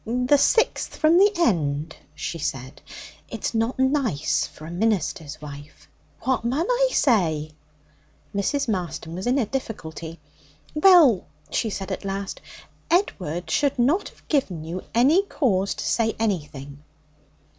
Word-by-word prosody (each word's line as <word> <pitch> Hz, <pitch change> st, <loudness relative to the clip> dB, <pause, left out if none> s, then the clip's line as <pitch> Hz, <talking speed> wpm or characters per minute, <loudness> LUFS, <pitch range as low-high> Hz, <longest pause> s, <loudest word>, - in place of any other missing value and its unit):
'The 250 Hz, +4 st, +2 dB
sixth 450 Hz, +10 st, +2 dB
from 315 Hz, +1 st, +4 dB
the 405 Hz, +1 st, +6 dB
end,' 160 Hz, -, 0 dB, 0.2 s
she 165 Hz, -, -5 dB
said; 130 Hz, -3 st, -5 dB, 0.5 s
'it's -, -, -4 dB
not 225 Hz, +3 st, 0 dB
nice 260 Hz, -, +1 dB
for 155 Hz, -, -13 dB
a 165 Hz, -, -7 dB
minister's 175 Hz, -6 st, -1 dB
wife.' 145 Hz, -1 st, -11 dB, 0.3 s
'What 260 Hz, 0 st, 0 dB
mun 265 Hz, +8 st, 0 dB
I -, -, +2 dB
say?' 160 Hz, -, +2 dB, 0.8 s
Mrs. 260 Hz, +8 st, 0 dB
Marston 175 Hz, -5 st, -3 dB
was 185 Hz, +6 st, -4 dB
in 250 Hz, +3 st, +2 dB
a 255 Hz, -, +2 dB
difficulty. 170 Hz, -, -6 dB, 0.5 s
'Well,' 305 Hz, -, +6 dB, 0.2 s
she 225 Hz, -, 0 dB
said 195 Hz, -2 st, -5 dB
at -, -, -4 dB
last, 195 Hz, 0 st, -4 dB, 0.5 s
'Edward 180 Hz, -, 0 dB
should 285 Hz, -2 st, +1 dB
not 290 Hz, +12 st, +2 dB
have -, -, -25 dB
given 195 Hz, -, 0 dB
you 170 Hz, +3 st, -5 dB
any 280 Hz, +11 st, +5 dB
cause 205 Hz, -, 0 dB
to -, -, -5 dB
say 225 Hz, -1 st, +1 dB
anything.' 145 Hz, -9 st, -3 dB
210 Hz, 135 wpm, -24 LUFS, 160-270 Hz, 0.8 s, the